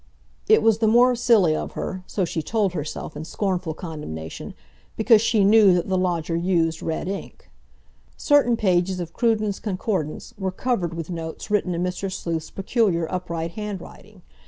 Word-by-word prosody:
It - - +6
was 225 -1 +4
the 225 - +2
more 245 +3 +5
silly 220 -9 +4
of - - -4
her—so 185 +1 -3
she 165 -1 -3
told 200 +2 0
herself 150 -3 -5
in 150 - -5
scornful 180 -2 -2
condemnation—because 160 - -2
she 225 -2 +2
knew 205 -2 +6
that 175 +2 -1
the 190 - +1
lodger 170 -3 -1
used 165 -2 +1
red 160 +1 -3
ink. 195 +1 -7 0.7
Certain 275 -5 +3
pages 185 -2 +1
of 170 -1 -5
Cruden's 215 -4 0
Concordance 185 -6 -3
were 190 -1 -1
covered 185 -5 -1
with 165 +1 -5
notes 165 +4 -6
written 190 -4 +1
in 170 - -1
Mr. 180 +1 -3
Sleuth's 165 -4 -3
peculiar 195 -4 0
upright 170 -2 -3
handwriting. 210 -2 -8
185 Hz, 155 wpm, -23 LUFS, 165-215 Hz, 0.7 s, It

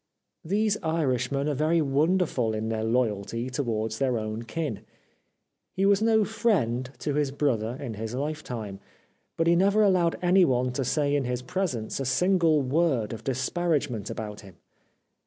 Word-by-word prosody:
These 210 +4 +1
Irishmen 140 -4 0
are 150 - +1
very 155 +4 +2
wonder 160 +6 +2
ful 115 -7 -1
in 110 +1 -3
their 110 -1 -2
loyalty 115 +1 -1
towards 110 -4 -2
their 130 -3 +1
own 110 0 -4
kin. 140 -1 -4 1.0
He 195 - +1
was 200 0 +4
no 220 -1 +3
friend 135 - 0 0.2
of 145 - 0
his 145 -2 +1
brother 125 -5 -1
in 130 -6 -5
his 110 +3 -5
lifetime, 125 -8 -4 0.6
but 165 - +1
he 170 +1 +4
never 200 +4 +4
allowed 180 -4 +3
anyone 170 -9 +3
to 130 +2 -2
say 145 +2 +1
in 140 -2 0
his 125 0 -3
presence 175 - -2
a 135 - -2
single 165 +2 +3
word 130 -6 +1
of 110 -1 -8
disparagement 135 - -1
about 105 -1 -6
him. 95 -4 -14
135 Hz, 155 wpm, -27 LUFS, 115-170 Hz, 1.0 s, was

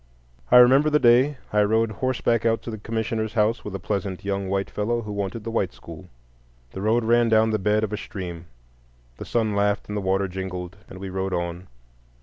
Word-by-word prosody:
I - - +7
remember 135 +5 +6
the 150 - +4
day 130 +2 +4 0.2
I 105 - +4
rode 110 +2 +2
horseback 120 0 0
out 115 -1 +1
to 115 - -6
the 110 - -6
commissioner's 110 0 -3
house 110 +1 +1
with 105 -2 -6
a - - -4
pleasant 100 -1 -3
young 100 -1 -2
white 100 0 -1
fellow 115 +3 -1
who 105 - -6
wanted 100 +2 -4
the 115 - -5
white 95 -5 -1
school. 85 +2 -12 0.6
The 95 - -7
road 110 +3 +2
ran 120 +1 +3
down 110 0 +4
the 110 - 0
bed 105 +2 +1
of 105 -1 -2
a - - -1
stream; 85 -5 -7 0.7
the - - -7
sun 110 -3 0
laughed 100 0 0
and 105 - -4
the 105 - -1
water 95 +1 0
jingled, 90 0 -6
and - - -10
we 95 0 -7
rode 95 0 -2
on. 85 +1 -4
105 Hz, 210 wpm, -24 LUFS, 95-115 Hz, 0.7 s, I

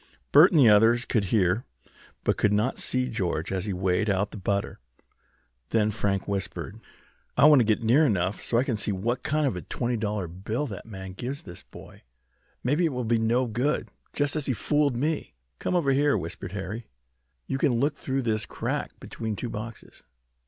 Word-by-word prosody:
Bert 155 +6 +8
and 165 - +3
the 130 - +7
others 115 +3 +5
could 110 -5 0
hear, 95 +2 +2 0.6
but - - +2
could 105 - +2
not 105 +5 +1
see 130 0 0
George 95 -9 -2
as 95 0 -1
he 105 - -2
weighed 95 +3 0
out 100 +1 0
the - - -8
butter. 100 0 -2 0.9
Then 110 -1 +2
Frank 100 -2 -1
whispered: 100 -2 -4 0.6
"I - - +6
want 150 -2 +8
to - - +5
get 110 +1 +1
near 125 +8 +5
enough 95 - 0
so 115 - 0
I 120 - +4
can 125 -5 -1
see 105 - -2
what 115 +6 -1
kind 155 0 0
of 135 - 0
a 90 - -4
twenty 120 -1 -2
dollar 105 -4 -2
bill 100 - -3
that 105 -5 -8
man 95 -3 -8
gives 125 +8 -5
this 85 - -10
boy. - - -14 0.6
Maybe 145 +8 +1
it 160 - 0
will 125 0 -2
be 115 0 +2
no 120 +3 +2
good, 125 +6 -1 0.2
just 145 0 0
as 150 -3 0
he 130 - +1
fooled 145 +2 +1
me." 150 - -2 0.2
"Come - - -1
over 155 -6 +2
here," 140 -1 +3
whispered 85 +1 -6
Harry. 105 +3 -5 0.6
"You 135 - -2
can 125 -5 +2
look 145 +3 +1
through 135 -2 -2
this 110 -2 0
crack - - -4
between 110 -2 -5
two 120 - -4
boxes. 110 +1 -8
115 Hz, 195 wpm, -26 LUFS, 100-135 Hz, 0.9 s, Bert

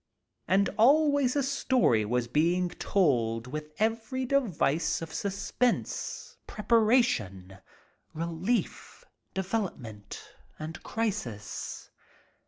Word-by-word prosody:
And 195 +3 +3
always 285 +1 +4
a 285 - +2
story 255 - +2
was 120 +2 0
being 170 +7 +2
told 120 - +1
with 150 +4 -6
every 225 +4 -1
device 205 - +1
of 165 -1 -7
suspense, 205 +5 -2
preparation, 210 - +1 0.5
relief, 170 +8 -3 0.3
development, 180 - -4 0.4
and 155 +1 -7
crisis. 160 - -4
185 Hz, 80 wpm, -29 LUFS, -, 0.5 s, always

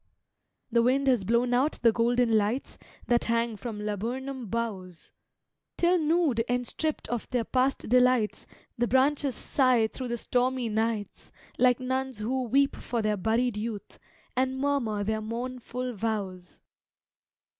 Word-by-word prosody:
The 235 0 +4
wind 260 +4 +2
has 250 -6 +3
blown 235 +4 +1
out 265 +5 +2
the 230 - +6
golden 235 0 +2
lights 215 +5 -1 0.3
That 240 -1 +2
hang 230 -1 0
from 215 +1 -6
laburnum 235 +5 -4
boughs, 195 -6 -4 0.7
Till 350 +1 +3
nude 310 -7 +2
and 245 0 0
stripped 310 +5 -2
of 240 -2 -3
their 245 -2 0
past 260 +3 0
delights 250 -2 +2 0.3
The 240 - +2
branches 275 +1 +2
sigh 255 -4 +2
through 250 +3 -5
the 240 0 -2
stormy 250 0 0
nights, 220 -2 -2 0.3
Like 250 0 +4
nuns 260 -1 -2
who 250 +5 -1
weep 275 +4 +2
for 235 -2 -3
their 215 0 +1
buried 225 +3 0
youth, 215 -1 -6 0.4
And 260 +1 0
murmur 265 -7 0
their 220 +1 -1
mournful 250 +2 -4
vows. 195 -4 -4
240 Hz, 140 wpm, -28 LUFS, 220-260 Hz, 0.7 s, the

